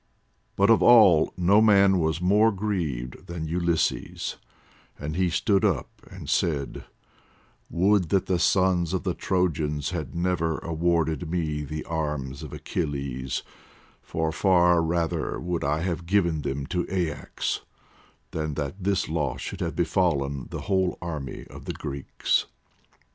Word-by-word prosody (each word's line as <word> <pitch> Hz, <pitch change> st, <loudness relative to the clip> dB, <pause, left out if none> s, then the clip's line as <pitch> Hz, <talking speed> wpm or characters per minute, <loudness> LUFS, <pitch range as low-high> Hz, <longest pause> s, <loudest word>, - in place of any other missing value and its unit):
But 100 Hz, +3 st, +4 dB
of 115 Hz, -, +5 dB
all 105 Hz, -10 st, +7 dB
no 95 Hz, +4 st, +5 dB
man 100 Hz, -3 st, +5 dB
was 80 Hz, 0 st, 0 dB
more 105 Hz, +5 st, +4 dB
grieved 85 Hz, -, -3 dB
than 85 Hz, -2 st, -5 dB
Ulysses, 85 Hz, 0 st, -1 dB, 0.6 s
and 75 Hz, +2 st, -5 dB
he 90 Hz, 0 st, +2 dB
stood 95 Hz, +4 st, +2 dB
up 90 Hz, -11 st, +1 dB, 0.2 s
and -, -, -10 dB
said: 70 Hz, -5 st, -1 dB, 0.8 s
"Would 95 Hz, 0 st, +2 dB
that 95 Hz, 0 st, +2 dB
the 90 Hz, -2 st, 0 dB
sons 90 Hz, -1 st, +2 dB
of 95 Hz, -, -2 dB
the 95 Hz, -3 st, 0 dB
Trojans 80 Hz, -5 st, -1 dB
had 80 Hz, -6 st, -5 dB
never 85 Hz, -2 st, 0 dB
awarded 85 Hz, -1 st, 0 dB
to 90 Hz, -, -6 dB
me 80 Hz, -3 st, -1 dB
the 75 Hz, +2 st, -5 dB
arms 75 Hz, -4 st, -3 dB
of 75 Hz, -, -8 dB
Achilles, 70 Hz, -5 st, -3 dB, 0.6 s
for 80 Hz, -1 st, -2 dB
far 90 Hz, 0 st, +4 dB
rather 80 Hz, 0 st, -1 dB
would 90 Hz, -1 st, -2 dB
I 75 Hz, +3 st, 0 dB
have 85 Hz, -1 st, -3 dB
given 85 Hz, -5 st, +2 dB
them 70 Hz, 0 st, -3 dB
to 90 Hz, +3 st, -2 dB
Aias 85 Hz, -5 st, -2 dB, 0.7 s
than 75 Hz, -2 st, -3 dB
that 80 Hz, +7 st, -4 dB
this 100 Hz, 0 st, +1 dB
loss 75 Hz, -3 st, -2 dB
should -, -, -6 dB
have -, -, -2 dB
befallen 70 Hz, -7 st, 0 dB
the -, -, -5 dB
whole 95 Hz, -2 st, 0 dB
army 75 Hz, -6 st, -5 dB
of -, -, -12 dB
the -, -, -3 dB
Greeks. 70 Hz, -2 st, -1 dB
85 Hz, 145 wpm, -26 LUFS, 75-95 Hz, 0.8 s, all